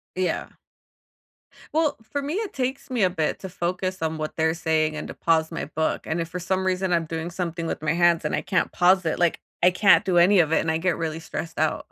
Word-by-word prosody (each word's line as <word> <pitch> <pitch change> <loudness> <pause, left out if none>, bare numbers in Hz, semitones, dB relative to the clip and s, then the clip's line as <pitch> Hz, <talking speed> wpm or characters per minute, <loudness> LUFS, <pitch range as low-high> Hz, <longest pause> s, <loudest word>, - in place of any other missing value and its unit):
Yeah. 185 0 -1 1.2
Well, 310 -2 +1
for 280 +6 -4
me, 290 +4 -3
it 430 0 -3
takes 265 +2 -3
me 245 -4 0
a 185 - +4
bit 160 -4 -1
to 190 - -6
focus 185 +1 -3
on 160 0 -1
what 155 0 -4
they're 160 0 +2
saying 155 -2 0
and - - -5
to - - -7
pause 160 -1 +1
my 165 - -4
book, 160 +1 -2
and 160 +2 -1
if 165 - -3
for 180 - -5
some 190 +1 -1
reason 185 0 0
I'm 170 -1 +2
doing 160 +1 -4
something 170 -2 -3
with 160 - -4
my 155 -1 +1
hands 170 0 +3
and - - -1
I - - +1
can't 185 - -1
pause 185 +1 +4
it, 160 - -1
like 175 -2 +1 0.2
I 180 - +7
can't 195 +3 +5
do 185 -2 0
any 185 +3 +6
of 160 -1 +2
it, - - +4
and 160 - -1
I 160 - +1
get 180 0 0
really 160 -1 -3
stressed 165 0 -6
out. 155 0 0
175 Hz, 245 wpm, -24 LUFS, 160-185 Hz, 1.2 s, I